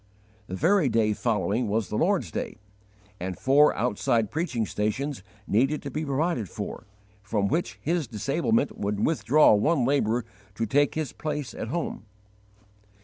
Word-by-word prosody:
The 95 Hz, -, -5 dB
very 170 Hz, -, +3 dB
day 110 Hz, -2 st, +2 dB
following 110 Hz, +1 st, 0 dB
was 105 Hz, -2 st, -1 dB
the -, -, -3 dB
Lord's 185 Hz, -, +1 dB
day, -, -, -4 dB, 0.6 s
and 90 Hz, 0 st, -4 dB
four 145 Hz, +3 st, +4 dB
outside 115 Hz, -2 st, 0 dB
preaching 140 Hz, -9 st, -1 dB
stations 125 Hz, +6 st, -2 dB, 0.2 s
needed 135 Hz, +8 st, +1 dB
to 140 Hz, -, -5 dB
be 155 Hz, +4 st, -3 dB
provided 140 Hz, -, -1 dB
for, -, -, -6 dB, 0.3 s
from 100 Hz, 0 st, 0 dB
which 165 Hz, -, -1 dB
his 165 Hz, -3 st, 0 dB
disablement 140 Hz, -, 0 dB
would 100 Hz, 0 st, 0 dB
withdraw 150 Hz, -1 st, +4 dB
one 130 Hz, +5 st, +2 dB
labourer 120 Hz, -4 st, +1 dB, 0.3 s
to 115 Hz, -, -1 dB
take 145 Hz, +6 st, +2 dB
his 155 Hz, -2 st, -3 dB
place 150 Hz, -5 st, -4 dB
at -, -, -5 dB
home. 140 Hz, -6 st, -4 dB
125 Hz, 145 wpm, -26 LUFS, 105-155 Hz, 0.6 s, four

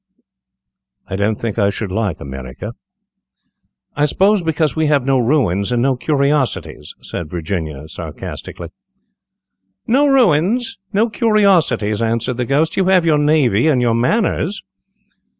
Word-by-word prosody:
"I -, -, -4 dB
don't 100 Hz, +2 st, 0 dB
think 115 Hz, -1 st, -3 dB
I 100 Hz, -1 st, +3 dB
should 100 Hz, 0 st, -4 dB
like 100 Hz, -3 st, -2 dB
America." 65 Hz, -2 st, -7 dB, 1.2 s
"I 145 Hz, -, +2 dB
suppose 195 Hz, +6 st, +2 dB
because 160 Hz, -2 st, 0 dB
we 160 Hz, -1 st, +1 dB
have 145 Hz, -4 st, +2 dB
no 135 Hz, -1 st, +2 dB
ruins 115 Hz, -, +1 dB
and 120 Hz, -, +1 dB
no 130 Hz, +2 st, +2 dB
curiosities," 140 Hz, -, -1 dB
said 85 Hz, -3 st, -6 dB
Virginia, 80 Hz, -4 st, -4 dB
satirically. 80 Hz, -, -8 dB, 1.2 s
"No 280 Hz, +4 st, +3 dB
ruins! 240 Hz, -, +2 dB
no 215 Hz, +3 st, +2 dB
curiosities!" 190 Hz, -, +2 dB
answered 115 Hz, +2 st, -1 dB
the 125 Hz, -, -1 dB
Ghost; 150 Hz, +5 st, 0 dB
"you 190 Hz, -, +2 dB
have 185 Hz, -2 st, +3 dB
your 155 Hz, -2 st, +3 dB
navy 145 Hz, -6 st, +2 dB
and 145 Hz, -5 st, +3 dB
your 120 Hz, -2 st, +2 dB
manners." 185 Hz, -, 0 dB
135 Hz, 130 wpm, -17 LUFS, 105-165 Hz, 1.2 s, I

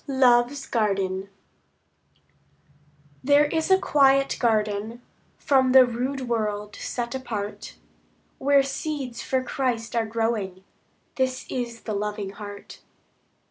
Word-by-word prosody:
Love's 260 Hz, 0 st, +3 dB
Garden 195 Hz, -3 st, -1 dB, 1.9 s
There 285 Hz, +2 st, +5 dB
is 320 Hz, +3 st, -1 dB
a 380 Hz, -, +6 dB
quiet 275 Hz, -5 st, +3 dB
garden, 220 Hz, 0 st, 0 dB, 0.3 s
From 260 Hz, -2 st, +2 dB
the 260 Hz, -1 st, +9 dB
rude 250 Hz, +3 st, -3 dB
world 210 Hz, -3 st, -2 dB
set 235 Hz, -1 st, -4 dB
apart, 220 Hz, -6 st, -5 dB, 0.6 s
Where 280 Hz, 0 st, +4 dB
seeds 275 Hz, -2 st, -4 dB
for 260 Hz, -1 st, -1 dB
Christ 245 Hz, -3 st, -2 dB
are 225 Hz, -1 st, +1 dB
growing; 220 Hz, -4 st, -2 dB, 0.5 s
This 260 Hz, -1 st, -1 dB
is 235 Hz, -2 st, -4 dB
the 215 Hz, -, -4 dB
loving 205 Hz, -1 st, -3 dB
heart. 205 Hz, 0 st, -10 dB
240 Hz, 105 wpm, -25 LUFS, 210-265 Hz, 1.9 s, the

